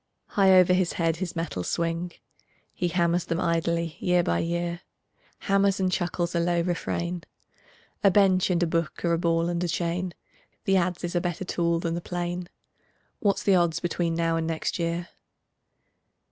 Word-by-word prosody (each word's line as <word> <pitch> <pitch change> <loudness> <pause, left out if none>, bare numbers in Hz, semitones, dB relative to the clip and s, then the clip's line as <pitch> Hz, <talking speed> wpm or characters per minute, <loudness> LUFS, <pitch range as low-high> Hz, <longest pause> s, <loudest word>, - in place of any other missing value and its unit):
High 195 -2 +4
over 180 0 +6
his 180 -1 +1
head 165 -1 0
his 185 -1 -4
metals 165 - -3
swing; 170 +1 -2 0.6
He 180 - -1
hammers 170 0 +1
them 165 0 -1
idly 170 -2 0
year 180 -1 +2
by 85 - +1
year, 170 +1 -2 0.6
Hammers 195 0 +2
and 185 -1 +1
chuckles 175 -1 -1
a 170 - +1
low 170 0 +1
refrain: 175 0 -2 0.8
"A 200 - +7
bench 190 -1 +4
and 175 -1 +2
a - - +4
book 165 +1 -2
are 170 - +2
a 165 - +1
ball 165 0 +1
and 175 0 -1
a - - 0
chain, 170 +1 -2 0.5
The 195 - +3
adze 180 -1 0
is 175 0 -3
a 175 - +2
better 175 +1 -3
tool 170 -2 0
than 165 -1 -1
the 170 - -3
plane; 175 0 -4 0.7
What's 200 -3 +1
the 200 - +4
odds 170 -3 +2
between 170 -1 -1
now 165 0 +1
and 165 0 -1
next 165 +2 -2
year?" 170 +1 -2
175 Hz, 175 wpm, -26 LUFS, 170-180 Hz, 0.8 s, A